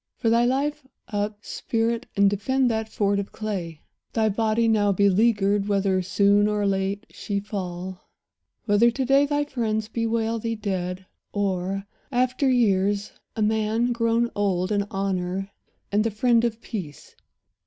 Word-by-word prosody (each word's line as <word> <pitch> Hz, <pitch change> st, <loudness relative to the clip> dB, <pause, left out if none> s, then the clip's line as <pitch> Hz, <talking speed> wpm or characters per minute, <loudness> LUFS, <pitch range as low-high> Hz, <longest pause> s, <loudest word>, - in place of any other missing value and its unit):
For 225 Hz, -, +1 dB
thy 235 Hz, +1 st, +4 dB
life, 275 Hz, +2 st, -1 dB, 0.2 s
Up, 205 Hz, 0 st, -3 dB
spirit, 230 Hz, 0 st, -1 dB
and 200 Hz, 0 st, +5 dB
defend 245 Hz, +6 st, +1 dB
that 220 Hz, 0 st, -2 dB
fort 200 Hz, -2 st, +1 dB
of 200 Hz, -, -5 dB
clay, 180 Hz, -8 st, -5 dB, 0.3 s
Thy 220 Hz, -1 st, +2 dB
body, 220 Hz, +2 st, +1 dB
now 210 Hz, -2 st, +3 dB
beleaguered; 200 Hz, +1 st, +3 dB
whether 195 Hz, -2 st, +1 dB
soon 200 Hz, +2 st, +3 dB
Or 210 Hz, -1 st, 0 dB
late 195 Hz, +1 st, -1 dB
she 200 Hz, -1 st, -3 dB
fall; 185 Hz, -2 st, -6 dB, 0.6 s
whether 210 Hz, +2 st, +4 dB
to 255 Hz, +3 st, -2 dB
day 275 Hz, +2 st, +4 dB
thy 290 Hz, 0 st, +1 dB
friends 220 Hz, -6 st, -2 dB
Bewail 230 Hz, 0 st, -1 dB
thee 230 Hz, +1 st, -2 dB
dead, 185 Hz, -3 st, -3 dB, 0.3 s
or, 195 Hz, -1 st, -1 dB, 0.3 s
after 255 Hz, +2 st, +1 dB
years, 205 Hz, -4 st, +2 dB, 0.2 s
a 220 Hz, -, 0 dB
man 220 Hz, +2 st, +1 dB
Grown 230 Hz, 0 st, +1 dB
old 190 Hz, -2 st, 0 dB
in 200 Hz, -1 st, 0 dB
honour 195 Hz, 0 st, -2 dB, 0.4 s
and 205 Hz, +1 st, +3 dB
the 225 Hz, -, +1 dB
friend 230 Hz, +2 st, +2 dB
of 230 Hz, -1 st, -2 dB
peace. 170 Hz, -, -7 dB
210 Hz, 145 wpm, -24 LUFS, 195-230 Hz, 0.6 s, and